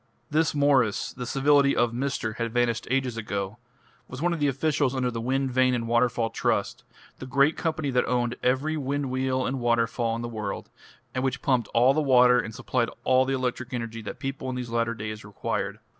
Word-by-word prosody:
This 155 Hz, 0 st, +2 dB
Mwres 135 Hz, -7 st, +2 dB
the 125 Hz, -1 st, -6 dB
civility 140 Hz, +1 st, +3 dB
of 120 Hz, -1 st, +2 dB
"Mr." 120 Hz, -3 st, -2 dB
had 115 Hz, -1 st, -2 dB
vanished 120 Hz, -1 st, 0 dB
ages 130 Hz, -2 st, 0 dB
ago 100 Hz, 0 st, -4 dB, 0.5 s
was 125 Hz, -, -8 dB
one 170 Hz, +3 st, +1 dB
of 170 Hz, -, -3 dB
the 145 Hz, -, +2 dB
officials 140 Hz, 0 st, +1 dB
under 125 Hz, -1 st, 0 dB
the 115 Hz, -1 st, -4 dB
Wind 135 Hz, +2 st, 0 dB
Vane 130 Hz, 0 st, +3 dB
and 115 Hz, -1 st, -3 dB
Waterfall 120 Hz, -1 st, +1 dB
Trust, -, -, -1 dB, 0.4 s
the 130 Hz, -, -7 dB
great 140 Hz, +4 st, +3 dB
company 155 Hz, -4 st, -2 dB
that 125 Hz, -1 st, +1 dB
owned 120 Hz, -1 st, 0 dB
every 135 Hz, +5 st, +1 dB
wind 140 Hz, -1 st, -2 dB
wheel 130 Hz, 0 st, 0 dB
and 135 Hz, +1 st, -2 dB
waterfall 115 Hz, -1 st, +1 dB
in 115 Hz, -, -4 dB
the -, -, -3 dB
world, 105 Hz, -4 st, -5 dB, 0.4 s
and 130 Hz, -, -2 dB
which 135 Hz, 0 st, -2 dB
pumped 125 Hz, -4 st, +2 dB
all 125 Hz, +3 st, +5 dB
the 155 Hz, -, +1 dB
water 125 Hz, -3 st, +5 dB
and 110 Hz, -2 st, -4 dB
supplied 120 Hz, -2 st, -1 dB
all 130 Hz, 0 st, +4 dB
the 135 Hz, +1 st, 0 dB
electric 130 Hz, -1 st, -3 dB
energy 115 Hz, -1 st, -5 dB
that 105 Hz, -, -7 dB
people 135 Hz, -1 st, -4 dB
in 130 Hz, -, -3 dB
these 125 Hz, -2 st, -5 dB
latter 115 Hz, 0 st, 0 dB
days 110 Hz, 0 st, -6 dB
required. 105 Hz, -1 st, -3 dB
125 Hz, 205 wpm, -26 LUFS, 115-135 Hz, 0.5 s, all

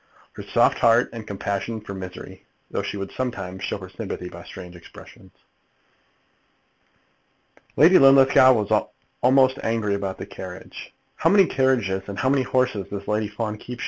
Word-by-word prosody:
Her -, -, -9 dB
soft -, -, +2 dB
heart 115 Hz, +1 st, +3 dB
had 115 Hz, -2 st, -8 dB
compassion 100 Hz, +3 st, -4 dB
for 105 Hz, -2 st, -9 dB
misery, 95 Hz, -1 st, -9 dB, 0.3 s
though -, -, -2 dB
she -, -, -5 dB
would 100 Hz, 0 st, -6 dB
sometimes 95 Hz, -8 st, -5 dB
show -, -, -2 dB
her -, -, -10 dB
sympathy 90 Hz, -, -6 dB
by 85 Hz, 0 st, -11 dB
strange 90 Hz, -2 st, -11 dB
expressions. 85 Hz, -, -15 dB, 2.5 s
Lady 175 Hz, +5 st, +7 dB
Linlithgow 135 Hz, -1 st, +6 dB
was 105 Hz, -4 st, -2 dB, 0.5 s
almost 130 Hz, +1 st, +4 dB
angry 115 Hz, -2 st, -1 dB
about 100 Hz, -1 st, -3 dB
the -, -, -7 dB
carriage. -, -, -10 dB, 0.3 s
"How -, -, +2 dB
many 200 Hz, -1 st, +6 dB
carriages 125 Hz, -, 0 dB
and 100 Hz, -1 st, -7 dB
how 130 Hz, -, +1 dB
many 140 Hz, 0 st, +2 dB
horses 125 Hz, -5 st, -1 dB
does 100 Hz, -1 st, -7 dB
Lady 105 Hz, 0 st, 0 dB
Fawn 105 Hz, 0 st, -4 dB
keep?" 125 Hz, +2 st, -9 dB
110 Hz, 155 wpm, -23 LUFS, 100-130 Hz, 2.5 s, Lady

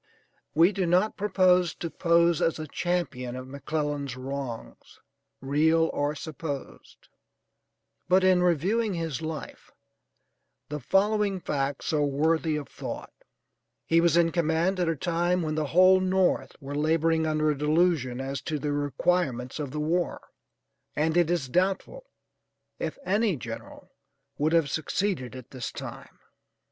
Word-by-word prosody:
We 170 Hz, +5 st, +6 dB
do 190 Hz, -3 st, -1 dB
not 185 Hz, +5 st, +2 dB
propose 185 Hz, -4 st, +3 dB
to 170 Hz, -, -5 dB
pose 170 Hz, -1 st, +3 dB
as 165 Hz, -, +1 dB
a 155 Hz, -, -5 dB
champion 145 Hz, -7 st, -2 dB
of 130 Hz, 0 st, -7 dB
McClellan's 145 Hz, -1 st, -3 dB
wrongs, 130 Hz, -3 st, -7 dB, 0.4 s
real 160 Hz, +4 st, +2 dB
or 145 Hz, +1 st, -1 dB
supposed, 150 Hz, -2 st, -7 dB, 1.0 s
but 185 Hz, +1 st, +5 dB
in 185 Hz, -1 st, +4 dB
reviewing 185 Hz, +5 st, +1 dB
his 165 Hz, -3 st, -3 dB
life 160 Hz, -1 st, -7 dB, 1.0 s
the 150 Hz, 0 st, -4 dB
following 200 Hz, -, +1 dB
facts 140 Hz, -2 st, -2 dB
are 150 Hz, -, +2 dB
worthy 155 Hz, +3 st, +1 dB
of 145 Hz, -3 st, -4 dB
thought: -, -, -7 dB, 0.7 s
He 165 Hz, 0 st, +4 dB
was 170 Hz, -1 st, +3 dB
in 170 Hz, -1 st, +4 dB
command 170 Hz, +3 st, +1 dB
at 175 Hz, -2 st, +1 dB
a 165 Hz, -, 0 dB
time 175 Hz, +3 st, 0 dB
when 155 Hz, -1 st, -2 dB
the 155 Hz, -1 st, -1 dB
whole 185 Hz, +4 st, +6 dB
North 185 Hz, 0 st, +1 dB
were 140 Hz, -1 st, -7 dB
laboring 160 Hz, +2 st, +1 dB
under 155 Hz, 0 st, +1 dB
a -, -, -1 dB
delusion 150 Hz, -4 st, +1 dB
as 135 Hz, 0 st, -4 dB
to 150 Hz, +2 st, -3 dB
the 145 Hz, +1 st, -2 dB
requirements 145 Hz, -2 st, -1 dB
of 145 Hz, -3 st, -3 dB
the 150 Hz, +3 st, -5 dB
war, 170 Hz, +3 st, -1 dB, 0.7 s
and 160 Hz, +2 st, +1 dB
it 175 Hz, -2 st, +3 dB
is 170 Hz, -6 st, 0 dB
doubtful 195 Hz, -, -1 dB, 0.7 s
if -, -, -3 dB
any 205 Hz, -1 st, +2 dB
general 115 Hz, -3 st, -9 dB, 0.5 s
would 155 Hz, +3 st, +1 dB
have 165 Hz, -3 st, +4 dB
succeeded 160 Hz, -3 st, -2 dB
at 130 Hz, -2 st, -11 dB
this 130 Hz, -2 st, -5 dB
time. -, -, -9 dB
160 Hz, 140 wpm, -27 LUFS, 145-180 Hz, 1.0 s, We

